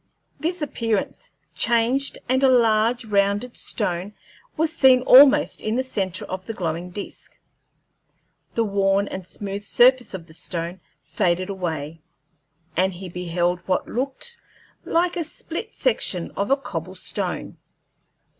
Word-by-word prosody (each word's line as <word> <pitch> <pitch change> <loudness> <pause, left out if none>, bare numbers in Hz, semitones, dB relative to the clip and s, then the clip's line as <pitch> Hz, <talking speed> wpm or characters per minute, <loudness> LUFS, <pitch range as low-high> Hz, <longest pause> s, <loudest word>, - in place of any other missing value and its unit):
This 335 0 -2
appearance 225 -7 -2 0.2
changed, 235 - +1
and 260 +2 +2
a 265 - +6
large 230 -1 +3
rounded 205 +3 +1
stone 195 -1 -2 0.4
was 320 +1 +1
seen 260 -4 +6
almost 275 +3 +7
in 215 +1 -1
the 260 - +1
centre 190 -8 -3
of 185 0 -6
the 225 - -4
glowing 170 -1 -3
disk. 200 +3 -9 1.2
The 230 - +2
worn 200 -1 +1
and 185 -2 -6
smooth 200 0 -5
surface 245 +2 +4
of 170 -3 -8
the 160 - -16
stone 170 +2 -5 0.2
faded 175 +4 0
away, 165 -4 -4 0.7
and 190 +2 +2
he 180 +1 -8
beheld 175 0 -1
what 185 - 0
looked 275 - -2 0.5
like 345 +1 +1
a 340 - 0
split 335 +7 -6
section 185 - -1
of 200 - -2
a 275 - +4
cobble 275 - -6
stone. - - -4
205 Hz, 135 wpm, -23 LUFS, 180-255 Hz, 1.2 s, almost